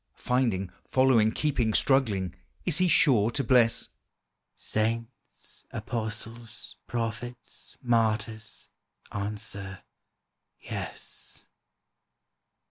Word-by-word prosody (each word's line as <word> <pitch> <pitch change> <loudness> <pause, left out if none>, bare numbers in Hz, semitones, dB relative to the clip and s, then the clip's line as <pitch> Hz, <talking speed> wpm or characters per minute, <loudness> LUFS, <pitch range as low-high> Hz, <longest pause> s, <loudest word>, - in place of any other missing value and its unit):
Finding, 115 -8 +1 0.2
following, 130 -5 +5
keeping, 120 -6 +1
struggling, 105 - +2 0.3
Is 170 -1 +1
He 185 - +5
sure 125 -11 +5
to 140 +4 -1
bless? 120 -2 +4 0.7
"Saints, 115 +2 -2
apostles, 115 +1 -2
prophets, 120 +1 -4
martyrs, 110 -2 0 0.4
Answer, 100 -2 -3 0.8
Yes." - - -4
115 Hz, 70 wpm, -29 LUFS, 110-125 Hz, 0.8 s, following